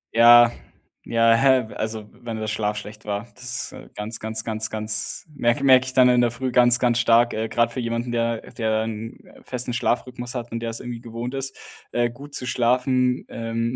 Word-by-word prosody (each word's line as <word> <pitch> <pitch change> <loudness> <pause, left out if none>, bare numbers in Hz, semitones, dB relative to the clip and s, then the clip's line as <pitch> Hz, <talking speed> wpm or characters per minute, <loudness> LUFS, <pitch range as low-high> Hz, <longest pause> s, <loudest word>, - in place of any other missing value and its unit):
Ja, 120 0 +8 0.5
ja, 115 0 +4
hä, 130 -2 +3
w - - -10
also, 110 -1 -4
wenn 115 -2 -7
der 110 - -3
Schlaf 105 -1 -1
schlecht 105 +1 -9
war, 105 +1 -3
das 125 -1 -5
ist - - -13
ganz, 105 +2 -5
ganz, 110 0 -3
ganz, 110 -1 -2
ganz 110 0 -3
merk 120 +3 +1
merke 130 -1 +6
ich 130 - -5
dann 130 -1 +6
in 125 -1 +4
der 120 - +3
Früh 125 +2 -4
ganz, 120 0 +5
ganz 120 -1 +2
stark, 120 +1 +4
äh, 110 +1 -2
grad 120 0 +1
für 130 - -4
jemanden, 115 +1 -2
der 115 -1 -1
der 110 -2 0
'n 115 0 -6 0.2
festen 125 -1 -4
Schlafrhythmus 125 +1 -2
hat 120 -1 -5
und 115 - -3
der 115 - -4
es 115 - -4
irgendwie 120 -1 -6
gewohnt 120 +1 -6
ist, 135 0 -3 0.4
äh, 120 -1 +1
gut 140 +4 -9
zu 125 - -3
schlafen, 125 +1 +1
ähm, 115 +1 -3
120 Hz, 205 wpm, -23 LUFS, 110-125 Hz, 0.5 s, Ja